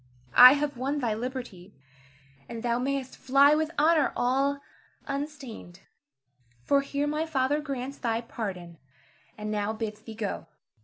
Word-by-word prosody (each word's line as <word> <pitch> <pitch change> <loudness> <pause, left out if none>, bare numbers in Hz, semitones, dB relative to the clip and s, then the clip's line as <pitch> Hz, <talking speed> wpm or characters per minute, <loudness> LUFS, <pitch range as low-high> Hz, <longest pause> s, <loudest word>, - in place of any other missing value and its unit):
I 250 +1 +10
have 290 -2 -2
won 275 +4 -2
thy 240 -6 0
liberty, 225 -6 -6 0.7
and 230 0 -6
thou 240 0 0
mayst 270 0 -3
fly 275 +2 +4
with 310 0 +1
honor 310 -1 +3
all 275 +3 +1 0.5
unstained; 275 - -6 0.8
for 280 - +3
here 280 +1 -2
my 305 +2 -1
father 290 0 0
grants 275 -2 -5
thy 230 -2 -1
pardon, 185 -8 -7 0.6
and 210 0 -5
now 210 0 -1
bids 215 -1 -5
thee 225 0 -10
go. 205 -6 -4
255 Hz, 140 wpm, -27 LUFS, 220-280 Hz, 0.8 s, I